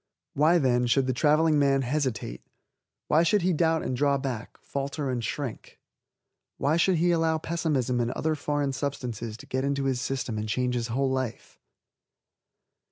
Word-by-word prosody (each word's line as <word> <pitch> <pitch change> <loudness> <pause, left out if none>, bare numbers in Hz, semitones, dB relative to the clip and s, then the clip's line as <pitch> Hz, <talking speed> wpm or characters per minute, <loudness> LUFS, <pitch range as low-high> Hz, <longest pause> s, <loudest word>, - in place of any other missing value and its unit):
Why, 155 +5 +4
then, 125 -5 +2
should 135 +2 +3
the 130 - 0
traveling 150 +3 +3
man 135 -1 +3
hesitate? 125 - -2 0.7
Why 155 - +4
should 170 +3 +2
he 185 0 +2
doubt 160 0 +2
and 130 - -2
draw 140 +2 +2
back, 130 -4 -5
falter 140 0 -3
and 120 -2 -2
shrink? 135 -1 -5 0.8
Why 150 +3 +1
should 180 +2 +3
he 175 +2 +2
allow 165 -1 +2
pessimism 150 -7 -1
and 120 -1 0
other 155 +5 -1
foreign 145 -2 -1
substances 125 -5 -4
to - - -12
get 130 +1 -2
into 140 0 0
his 130 -2 0
system 125 -4 -2
and 110 0 -4
change 125 +2 0
his 120 -1 -1
whole 130 +3 0
life? 130 -3 -4
135 Hz, 165 wpm, -27 LUFS, 125-155 Hz, 0.8 s, Why